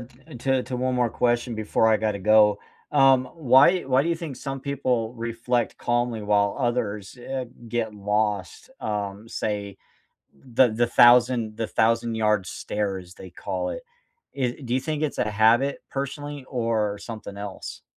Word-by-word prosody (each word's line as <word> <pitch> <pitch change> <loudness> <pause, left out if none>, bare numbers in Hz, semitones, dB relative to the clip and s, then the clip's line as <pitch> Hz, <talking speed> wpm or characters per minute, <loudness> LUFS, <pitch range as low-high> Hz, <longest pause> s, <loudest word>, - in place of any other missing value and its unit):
t 120 +1 -14
uh, - - -10
to 130 +1 +1
to 125 -1 -4
one 130 +1 -1
more 120 -2 +1
question 120 0 0
before 110 +1 +1
I 110 - +4
gotta 105 -2 -1
go. 105 +1 +5 0.3
Um, 135 -2 +5
why 150 +4 +5
why 135 0 +2
do 165 - -2
you 170 - +2
think 160 -6 -7
some 135 -1 -5
people 130 -5 -1
reflect 115 +1 -2
calmly 120 -2 -1
while 100 -1 +2
others, 115 -5 -2
eh, 130 +1 -4 0.2
get 115 -2 -2
lost, 105 - -2
um, 105 0 -4
say, 100 -3 -4 0.6
the 125 -1 +2
the 120 +2 +1
thousand 120 -2 +5
the 115 - -2
thousand-yard 110 -3 +1
stare, 100 +1 -3
as 90 -1 -11
they 95 - -11
call 90 - -4
it. - - -6 0.5
I 125 -2 -1
Do 120 -1 -3
you 130 - +2
think 155 -1 -3
it's 150 - -2
a - - +1
habit, 115 +6 +3
personally, 140 0 -5
or 115 -5 -1
something 110 -3 -8
else? 100 -2 -7
115 Hz, 165 wpm, -25 LUFS, 105-130 Hz, 0.6 s, go